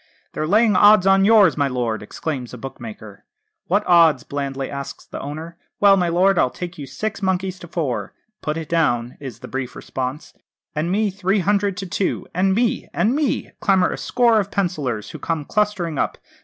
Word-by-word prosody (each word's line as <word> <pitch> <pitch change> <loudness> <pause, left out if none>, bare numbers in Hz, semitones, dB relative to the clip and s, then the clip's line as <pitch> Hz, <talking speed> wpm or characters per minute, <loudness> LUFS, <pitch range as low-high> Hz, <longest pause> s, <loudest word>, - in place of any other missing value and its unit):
'They're 155 - -2
laying 215 +3 +4
odds 205 0 +6
on 195 0 +5
yours, 210 -5 +6
my 140 -1 +1
lord,' 120 -4 -2
exclaims 125 +3 -5
a - - -9
bookmaker. 110 -5 -9 0.4
'What 205 +4 +1
odds?' 165 -7 +5
blandly 135 -1 -4
asks 140 -1 -7
the - - -8
owner. 160 +4 -7 0.2
'Well, 200 -1 +6
my 180 -3 +1
lord, 180 +2 +3
I'll - - +3
take 175 +4 -7
you 140 - -6
six 215 +9 -4
monkeys 190 -1 -1
to 175 - -10
four!' 150 -8 -3 0.3
'Put 150 +1 -2
it 160 -2 -5
down,' 125 -8 0
is 130 -6 -8
the - - -8
brief 130 -1 -5
response. 130 +3 -5 0.4
'And 155 +3 -1
me, 210 +1 +1
three 195 +1 0
hundred 200 0 +1
to 195 - -4
two 185 +1 -2
and 190 +2 +2
me 235 +1 0
and 230 +5 +2
me!' 295 -3 -1
clamour 190 -3 +3
a - - -4
score 235 -3 +3
of 200 -1 -2
pencillers, 140 - -2
who - - -8
come 165 -3 -2
clustering 195 -7 -1
up. - - -1
170 Hz, 190 wpm, -21 LUFS, 140-195 Hz, 0.4 s, odds